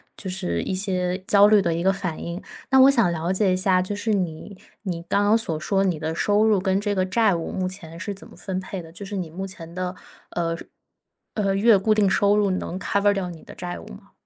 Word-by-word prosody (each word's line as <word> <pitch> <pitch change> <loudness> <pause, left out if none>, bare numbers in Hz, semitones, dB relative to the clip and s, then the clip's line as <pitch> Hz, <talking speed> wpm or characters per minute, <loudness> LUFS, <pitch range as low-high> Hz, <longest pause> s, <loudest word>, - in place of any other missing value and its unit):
就 190 - -6
是 85 - -2
一 - - -3
些， 185 -2 0
焦 205 0 +7
虑 210 -1 +5
的 170 -3 0
一 170 - -2
个 190 - +4
反 180 -4 -4
应。 170 +3 -5 0.3
那 265 -1 +5
我 265 +1 +8
想 235 -10 +3
了 170 +2 -1
解 190 -1 +2
一 - - +1
下， 185 -1 +3
就 185 +3 -3
是 215 +1 -1
你 185 0 -3 0.3
你 175 -5 -3
刚 205 0 +2
刚 215 +2 +5
所 165 -8 -2
说， 195 +4 +1
你 180 -5 0
的 160 +1 -3
收 205 +3 +2
入 215 -2 +4
跟 190 +1 +1
这 205 -1 -1
个 185 - +1
债 205 0 +2
务 165 - -4
目 185 -1 -2
前 170 -3 -7
是 200 +3 -4
怎 195 - -8
么 - - -16
分 190 -1 -3
配 190 -1 -6
的？ 165 - -13
就 200 - -8
是 200 0 -5
你 175 -4 -4
目 190 +4 -5
前 170 -3 -8
的， 185 0 -3 0.4
呃， 165 -1 -2 0.8
呃， 200 -3 0
月 210 +2 +5
固 215 +3 +2
定 205 -2 +3
收 205 +1 +3
入 205 -1 +2
能 185 0 -3
cover 200 +1 +2
掉 190 -3 -3
你 165 -2 -10
的 - - -12
债 175 0 -5
务 - - -11
吗？ - - -13
190 Hz, 285 characters per minute, -24 LUFS, 175-205 Hz, 0.8 s, 我